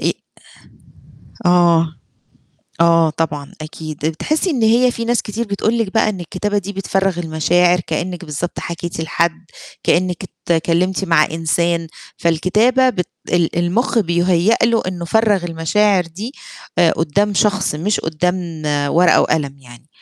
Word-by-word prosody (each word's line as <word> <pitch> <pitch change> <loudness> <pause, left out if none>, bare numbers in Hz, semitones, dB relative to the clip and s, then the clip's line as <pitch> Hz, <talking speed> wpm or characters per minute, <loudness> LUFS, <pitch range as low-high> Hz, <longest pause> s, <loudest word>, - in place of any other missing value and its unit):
إ - - +1 1.3
آه. 170 -2 +3 0.9
آه، 165 -1 +4
طبعًا، 150 -3 -3
أكيد، 155 -1 -8
آآ 160 - +2
بتحسّي 310 - -1
إن 255 -7 -1
هي 240 +3 +4
في 230 -1 -4
ناس 240 0 +1
كتير 220 +3 -4
بتقول 215 +3 -1
لِك 210 -4 -1
بقى 220 - +3
إن 195 -4 -4
الكتابة 205 +4 -2
دي 200 +1 -5
بتفرّغ 195 -1 -1
المشاعر، 175 +2 +2
كإنِّك 175 +2 -3
بالضبط 155 +3 -5
حكيتِ 170 -1 -5
لحد، 165 +1 -1 0.4
كإنِّك 180 +1 +1 0.3
أتكلّمتِ 175 +3 +1
مع 165 -3 +4
إنسان. 165 +1 -1 0.3
فالكتابة 215 +11 +2
بت 180 -6 -3 0.2
ال 170 -1 +1
المُخ 215 +8 +1
بيُهيّأ 175 +2 +2
له 230 -1 +2
إنه 175 -2 -5
فَرّغ 205 0 +2
المشاعر 180 +4 +1
دي 205 +10 -7 0.5
آآ 170 -2 +5
قدّام 200 +6 0
شخص 205 -4 +1
مش 195 +7 -1
قدّام 170 0 -2 0.3
ورقة 175 +3 +4
وقلم 140 -3 0
يعني، 120 +3 -16
175 Hz, 140 wpm, -18 LUFS, 165-205 Hz, 1.3 s, آآ